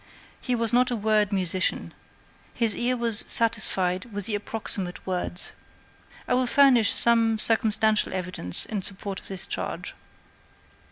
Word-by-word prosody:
He 250 - -2
was 230 -1 -1
not 250 +1 +2
a 245 - -2
word 215 -1 0
musician. 185 -1 -1 0.6
His 230 -3 +3
ear 250 +1 -1
was 230 -3 +5
satisfied 195 -5 +2
with 205 -2 -5
the 220 - -3
approximate 205 -3 -4
word. 180 -1 -4 0.9
I - - -1
will 255 0 0
furnish 250 -5 +3
some 230 -1 +2
circumstantial 220 -1 +1
evidence 180 - +1
in 210 -3 -5
support 195 0 -6
of - - -17
this 190 -2 -5
charge. - - -6
215 Hz, 135 wpm, -24 LUFS, 190-230 Hz, 0.9 s, was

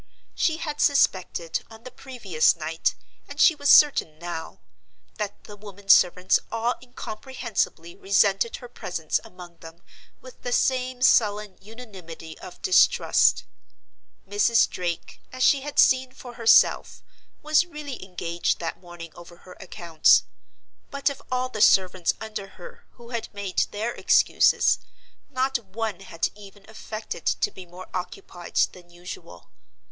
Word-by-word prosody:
She 320 -1 0
had 300 -2 -4
suspected, 185 - +1
on 225 0 -14
the 255 - -10
previous 230 -12 0
night, 160 0 -2 0.3
and - - -9
she 335 - +6
was 285 -2 -2
certain 275 - +5
now, 170 -1 -7 0.6
that 205 -1 -5
the 210 - -11
women 200 -1 -13
servants 180 0 +5
all 230 +2 0
incomprehensibly 230 -7 -5
resented 200 +3 +1
her 245 - -10
presence 175 -9 -3
among 175 -2 -13
them 165 +2 -14 0.4
with 255 -1 -15
the 245 - -4
same 255 0 0
sullen 210 -5 +3
unanimity 190 -8 -11
of 180 - -12
distrust. 375 - +4 0.8
Mrs. 210 +3 +3
Drake, 175 -2 -5
as 255 0 -3
she 275 +1 +4
had 290 +1 -8
seen 260 -1 +4
for 245 -1 -11
herself, 230 -1 +3 0.4
was 305 +3 +3
really 300 - -8
engaged 175 -2 -2
that 165 - -5
morning 175 -2 -11
over 175 0 -14
her 180 - -12
accounts. 170 -4 +2 0.7
But 280 0 -1
of 280 - -10
all 255 0 0
the 220 -4 -6
servants 185 -3 +3
under 215 -3 -6
her 175 - -12
who 235 -1 -15
had 235 -2 -5
made 200 -2 -1
their 220 +3 -3
excuses - - +3 0.5
not 265 -1 0
one 220 0 -5
had 170 -4 -3
even 200 -1 -15
affected 215 -4 -7
to - - 0
be 185 -1 -12
more 180 +2 -11
occupied 180 -1 -7 0.2
than 175 -1 -16
usual. 175 - -11
205 Hz, 140 wpm, -24 LUFS, 175-250 Hz, 0.8 s, she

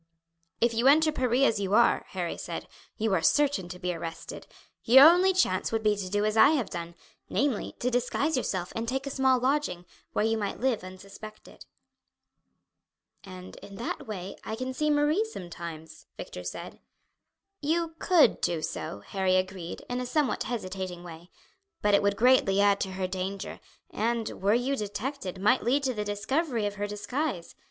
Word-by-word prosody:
"If 235 0 +2
you 235 +3 +2
enter 310 +3 +5
Paris 255 -2 +1
as 220 - 0
you 200 0 0
are," 235 +1 +4
Harry 175 -3 -3
said, - - -6 0.3
"you 220 -2 0
are 175 - +2
certain 280 - +2
to 180 - -7
be 180 0 -2
arrested. 165 0 -7 0.4
Your 265 +5 +9
only 360 +3 +5
chance 200 - +1
would 225 -1 -1
be 210 -1 +3
to 195 -2 -5
do 205 +2 0
as 215 0 0
I 225 - +7
have 245 - -3
done, 170 -1 -6 0.3
namely 275 -6 -1
to 250 - -1
disguise 250 +5 0
yourself 185 -8 -2
and 225 0 -3
take 265 +3 -2
a 275 - -4
small 265 -1 +3
lodging, 255 -8 -1 0.3
where 210 - +1
you 225 0 +1
might 200 -2 -3
live 245 -6 0
unsuspected." 195 +3 -12 1.6
"And 185 -1 -10
in 200 - -11
that 230 +2 -5
way 195 -3 -6
I 220 - -4
can 255 +3 -4
see 305 +3 0
Marie 295 +7 +3
sometimes," 170 - -9
Victor - - -7
said. - - -7 0.8
"You 325 +2 0
could 350 -4 +4
do 165 -2 -1
so," 100 - -5
Harry 190 - 0
agreed, 185 -2 -3
in 245 0 -2
a 250 - -4
somewhat 295 0 0
hesitating 185 -6 -5
way, 170 0 -11 0.5
"but 205 0 +3
it 200 - +5
would 200 0 +1
greatly 240 -5 +4
add 200 0 +4
to 190 -1 -3
her 185 0 -2
danger, 190 +1 -4 0.3
and, 230 0 -2
were 200 +3 +3
you 255 +3 0
detected, 210 -2 -4
might 230 +7 +3
lead 275 +4 +1
to 260 -2 0
the 210 -2 -3
discovery 225 +4 -1
of 205 - -2
her 205 0 -2
disguise. 210 - -3
215 Hz, 180 wpm, -28 LUFS, 185-260 Hz, 1.6 s, Your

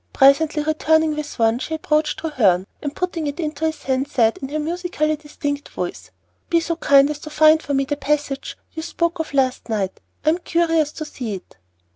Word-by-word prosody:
Presently 295 +3 +4
returning 315 0 +2
with 300 0 -5
one, 225 +1 +2
she 320 - -3
approached 305 -1 0
Treherne, 210 - +2 0.2
and, 290 -1 -4
putting 345 -4 -2
it 285 +4 -4
into 310 -1 -2
his 315 -1 -5
hand, 265 +1 0
said, 225 -5 +2
in 270 - -6
her 300 - -2
musically 310 -1 -1
distinct 290 -1 -5
voice, - - -5 0.4
"Be 335 - +4
so 335 0 -2
kind 280 -2 +5
as 295 - -5
to 305 - -8
find 310 +1 +5
for 285 - -2
me 275 0 +2
the 290 +1 -2
passage 285 -1 -2 0.2
you 320 - -4
spoke 340 +1 -1
of 320 - -3
last 260 -3 +1
night. 200 -4 -2 0.3
I - - +5
am 330 +3 +2
curious 330 -3 +1
to 310 - -5
see 240 -8 -5
it." 185 - -12
300 Hz, 200 wpm, -21 LUFS, 275-315 Hz, 0.4 s, kind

